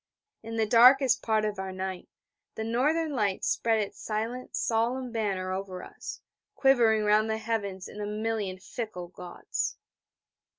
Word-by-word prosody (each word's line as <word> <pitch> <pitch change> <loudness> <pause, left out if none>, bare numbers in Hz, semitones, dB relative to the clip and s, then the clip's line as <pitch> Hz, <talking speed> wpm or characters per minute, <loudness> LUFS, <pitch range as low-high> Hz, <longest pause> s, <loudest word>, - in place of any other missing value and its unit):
In 225 0 -6
the 220 - +3
darkest 255 +3 +6
part 220 -1 +1
of 210 -2 -3
our 190 0 -4
night, 185 0 -5 0.5
the 220 - -3
Northern 295 +8 +1
Light 205 -6 0
spread 225 -1 +2
its 205 -1 -4
silent 225 +4 -3
solemn 240 +3 0
banner 195 -5 -1
over 190 -1 -5
us, - - -8 0.3
quivering 235 -5 +4
round 210 +1 +3
the 220 - 0
heavens 205 -4 -3
in 210 - -8
a 205 - -3
million 210 -3 -2
fickle 185 -2 -6
gauds. 180 -1 -4
220 Hz, 145 wpm, -28 LUFS, 195-230 Hz, 0.5 s, darkest